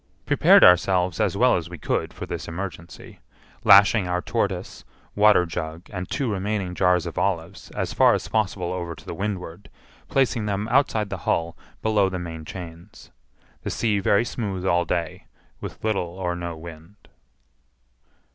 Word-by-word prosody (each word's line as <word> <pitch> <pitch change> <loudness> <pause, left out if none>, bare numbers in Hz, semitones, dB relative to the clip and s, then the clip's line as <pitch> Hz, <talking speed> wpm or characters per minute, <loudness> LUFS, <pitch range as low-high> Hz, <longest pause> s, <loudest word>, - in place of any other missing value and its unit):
Prepared - - +6
ourselves 90 +1 +4
as 100 -3 +1
well 125 +3 +4
as 85 -1 -5
we 90 - -8
could - - -2
for - - -7
this - - -6
emergency, 85 -1 -8 0.4
lashing 100 0 +6
our 90 0 0
tortoise, - - -3 0.3
waterjug, 90 -5 +2
and 90 -1 -5
two 135 - -1
remaining 100 -2 -2
jars 90 -1 +2
of 85 - -4
olives 90 -1 -2
as - - -2
far - - +5
as - - -4
possible 95 -5 -1
over 85 -2 -4
to - - -16
the - - -6
windward, 100 -1 -5 0.4
placing 125 -5 +1
them 100 +1 -2
outside 115 -6 +1
the 95 - -4
hull 85 0 0 0.3
below 105 -3 +2
the 95 - -4
main 80 -3 -7
chains. 85 +2 -10 0.5
The - - -4
sea 105 -3 0
very 100 +3 +2
smooth 100 -7 -4
all 85 -2 +2
day, 85 -1 -3 0.3
with - - -8
little 95 -5 -2
or 90 -2 -2
no 85 -1 -5
wind. 80 +3 -11
90 Hz, 155 wpm, -24 LUFS, 85-105 Hz, 0.5 s, Prepared